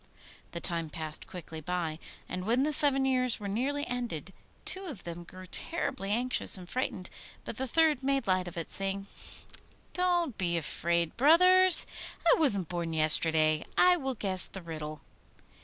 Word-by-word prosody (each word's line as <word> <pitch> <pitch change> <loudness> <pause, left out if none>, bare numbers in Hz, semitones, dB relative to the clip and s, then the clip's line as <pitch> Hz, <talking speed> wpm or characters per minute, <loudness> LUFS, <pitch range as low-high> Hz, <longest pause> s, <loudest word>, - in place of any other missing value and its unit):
The 170 - -4
time 170 -2 -2
passed 155 0 -7
quickly 165 -3 -9
away, 170 -3 -3 0.3
and 180 +1 -6
when 235 +6 0
the 305 +1 -1
seven 275 -2 +2
years 255 -3 +1
were 205 - -7
nearly 275 +8 -3
ended 230 -8 -5 0.3
two 380 +1 -3
of 275 - -9
them 170 0 -8
grew 185 +2 -13
terribly 260 - -2
anxious 245 0 0
and 180 -1 -12
frightened, 185 -5 -5 0.3
but - - -7
the 265 - -4
third 310 0 +1
made 275 -1 -1
light 185 -2 -1
of 175 0 -9
it, 165 - -6
saying, 195 0 -2 0.9
'Don't 350 - -1
be 170 -2 0
afraid, 170 +1 -2
brothers, 365 +6 +7 0.4
I 335 - +4
wasn't 200 - +2
born 170 -1 -5
yesterday; 155 0 +3
I 360 0 +5
will 265 -6 -4
guess 190 -4 +6
the 190 - -10
riddle. 155 -2 -8
195 Hz, 160 wpm, -28 LUFS, 170-270 Hz, 0.9 s, brothers